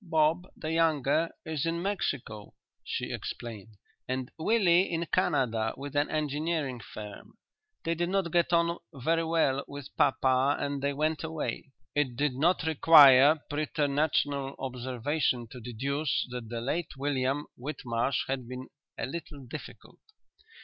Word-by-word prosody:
Bob, 160 +1 +2
the 155 - -4
younger, 160 -1 +2 0.2
is 155 -3 -2
in 165 0 -1
Mexico," 140 - -3 0.3
she - - -3
explained; 110 -2 -7 0.3
"and 130 0 -3
Willie 180 0 +3
in 170 0 -1
Canada 115 -4 +1
with 145 +1 -7
an 145 +1 +2
engineering 150 -3 -1
firm. 105 -2 -10 0.5
They 165 - 0
did 175 +1 -1
not 190 -3 0
get 175 +1 +2
on 170 0 +2 0.2
very 165 +5 +1
well 160 -4 +1
with 140 -1 -9
papa 135 0 +3
and 140 -1 -2
they 140 +1 +1
went 155 +3 -1
away." 155 -3 -4 0.2
It 140 -4 0
did 145 +1 +1
not 160 +8 +2
require 150 -2 +7
preternatural 145 -2 0
observation 130 0 -1
to 125 - -9
deduce 135 +5 -1
that 120 -3 -6
the 115 0 -4
late 155 +4 -3
William 140 0 0
Whitmarsh 125 -2 -2
had 130 -3 -3
been 130 +1 -7 0.3
"a - - -2
little 145 -2 -7
difficult." 150 +5 -10
145 Hz, 135 wpm, -29 LUFS, 130-160 Hz, 0.5 s, require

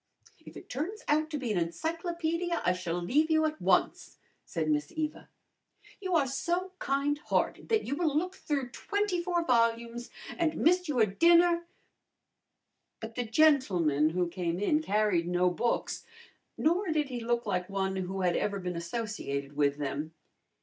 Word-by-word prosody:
"If - - -11
it - - -11
turns 335 - -4
out 310 +1 +2
to 305 - -3
be 250 -5 -3
an 195 - +1
encyclopedia 335 - -2
I 180 - +4
shall 175 -1 -3
leave 290 - +2
you 315 0 +3
at 310 0 -3
once," - - +1 0.3
said 160 -3 -3
Miss 150 -1 0
Eva. 310 -1 -4 0.7
"You 375 -3 -1
are 300 -4 +4
so 345 +8 -2
kind 280 +1 0
hearted - - -1
that 445 -1 +2
you 275 - -2
will 310 -3 +1
look 365 +4 -1
through 280 -8 -3
twenty 405 - -1
four 345 -1 0
volumes, 235 -1 +1 0.3
and 320 -2 +1
miss 360 +2 +3
your 250 -7 +3
dinner 340 - +4 0.6
" - - -54
But 225 0 -7
the 245 +1 -2
gentleman 205 - +3
who 175 +2 0
came 170 0 -2
in 300 +11 +2
carried 205 - +1
no 180 0 +2
books, 235 +6 -1 0.5
nor 350 +6 +1
did 305 -3 0
he 250 -2 -4
look 235 0 -1
like 180 -3 -1
one 190 -1 -1
who 190 +1 -3
had 175 -2 +2
ever 200 -1 0
been 180 -1 -4
associated 170 -7 -4
with 145 -1 +2
them. 150 +2 -4
245 Hz, 165 wpm, -30 LUFS, -, 0.7 s, I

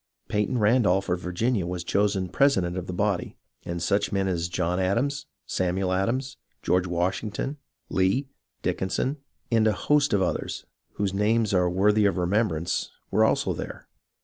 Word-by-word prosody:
Peyton 105 +4 0
Randolph 105 -4 +3
of 90 0 +1
Virginia 90 +2 -1
was 90 -1 -3
chosen 100 -1 +1
president 95 -11 +2
of 90 -1 -4
the - - -3
body, 95 -1 -1 0.3
and 85 0 -3
such 100 +3 +1
men 95 -1 0
as 85 -2 -1
John 90 +1 -1
Adams, 125 +10 0 0.2
Samuel 95 +1 0
Adams, 120 +8 -1 0.3
George 90 0 +2
Washington, 95 - -2 0.3
Lee, 95 +9 +1 0.4
Dickinson, 130 +9 -1 0.3
and 110 -1 +4
a 110 - +3
host 145 +7 +2
of 100 -2 +3
others, 90 - -3 0.3
whose 100 -2 -1
names 105 +1 +2
are 90 -1 +3
worthy 105 +3 +3
of 100 - 0
remembrance, 90 -2 0 0.2
were - - +4
also - - +2
there. - - -7
95 Hz, 150 wpm, -26 LUFS, 90-110 Hz, 0.4 s, and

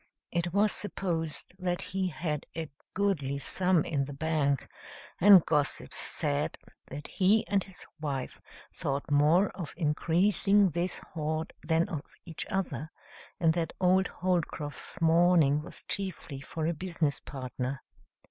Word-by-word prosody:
It 170 0 -1
was 205 +3 +3
supposed 170 -7 -3
that 180 -1 -1
he 190 -1 +1
had 155 -3 -3
a 160 -3 -4 0.2
goodly 160 -9 0
sum 180 +3 +1
in 140 -3 0
the 145 - -7
bank, 145 -3 0 0.5
and 195 -2 +8
gossips 150 -3 0
said 145 -1 -1 0.3
that 145 +2 -7
he 210 +4 +3
and 200 -2 +1
his 190 -3 -12
wife 140 -4 -4 0.3
thought 140 +1 -3
more 155 +7 +5
of 170 -6 -7
increasing 185 +5 +3
this 175 +3 -1 0.2
hoard 155 0 -2
than 165 +1 +2
of 150 -3 -6
each 165 -3 -4
other, 160 -5 -2 0.5
and 165 -2 +4
that 165 -1 -2
old 185 +1 +4
Holcroft's 170 -2 -2
mourning 165 -3 +4
was 155 - -10
chiefly 185 -8 -3
for 160 +2 -4
a 170 - +1
business 165 -3 -1
partner. 130 -1 -5
165 Hz, 135 wpm, -30 LUFS, 145-185 Hz, 0.5 s, and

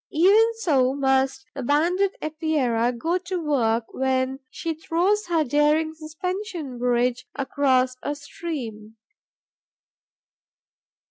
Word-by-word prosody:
Even 410 +8 +5
so 270 - +2
must 265 -1 +1
the 275 - -5
Banded 345 +9 +1
Epeira 295 -7 0
go 325 +9 -1
to 365 0 -4
work 240 -8 +1
when 265 0 0
she 330 +5 -4
throws 355 +6 0
her 330 -2 +2
daring 300 +3 +2
suspension 325 - -5
bridge 245 +1 +1
across 260 -2 +1
a 290 - -3
stream. 235 -8 -7
290 Hz, 105 wpm, -24 LUFS, 255-335 Hz, -, Even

